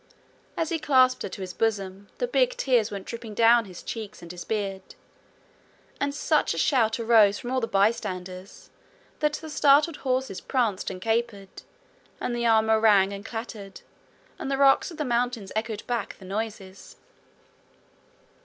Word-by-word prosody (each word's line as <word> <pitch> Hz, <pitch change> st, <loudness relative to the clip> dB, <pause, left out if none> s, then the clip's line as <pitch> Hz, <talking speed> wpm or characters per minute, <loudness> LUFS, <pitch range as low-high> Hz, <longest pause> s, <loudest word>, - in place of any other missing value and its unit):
As 325 Hz, -, -1 dB
he 330 Hz, -, -1 dB
clasped 255 Hz, -3 st, +3 dB
her -, -, -4 dB
to 195 Hz, -, -8 dB
his 185 Hz, -1 st, -6 dB
bosom, 200 Hz, -3 st, -2 dB
the -, -, -1 dB
big -, -, +1 dB
tears 245 Hz, -, +2 dB
went 200 Hz, -2 st, -7 dB
dropping 230 Hz, -2 st, -7 dB
down 230 Hz, +1 st, +5 dB
his 185 Hz, -3 st, -11 dB
cheeks 215 Hz, -5 st, -7 dB
and 170 Hz, -, -9 dB
his 175 Hz, 0 st, -8 dB
beard. 200 Hz, -3 st, -3 dB, 1.2 s
And 285 Hz, 0 st, 0 dB
such 295 Hz, -, +1 dB
a -, -, -6 dB
shout 225 Hz, -, +2 dB
arose 220 Hz, -3 st, +5 dB
from 245 Hz, -, -6 dB
all 260 Hz, 0 st, 0 dB
the 230 Hz, -, -1 dB
bystanders 190 Hz, -3 st, -2 dB, 0.5 s
that 300 Hz, -1 st, +1 dB
the 315 Hz, -, -6 dB
startled 295 Hz, +2 st, +4 dB
horses 255 Hz, -6 st, -2 dB
pranced 230 Hz, -8 st, -1 dB
and 185 Hz, -, -7 dB
capered, 225 Hz, -2 st, -2 dB, 0.6 s
and 240 Hz, -, -2 dB
the 235 Hz, 0 st, 0 dB
armour 220 Hz, -1 st, +4 dB
rang 200 Hz, -3 st, +4 dB
and 200 Hz, 0 st, -7 dB
clattered, 225 Hz, -3 st, -7 dB, 0.6 s
and -, -, -4 dB
the 275 Hz, -, 0 dB
rocks 275 Hz, +4 st, +4 dB
of 335 Hz, -, -10 dB
the 300 Hz, -, -2 dB
mountain 240 Hz, -3 st, -1 dB
echoed 220 Hz, -1 st, -3 dB
back 240 Hz, -1 st, -3 dB
the 190 Hz, -, -13 dB
noises. 200 Hz, -1 st, -6 dB
225 Hz, 165 wpm, -26 LUFS, 200-255 Hz, 1.2 s, down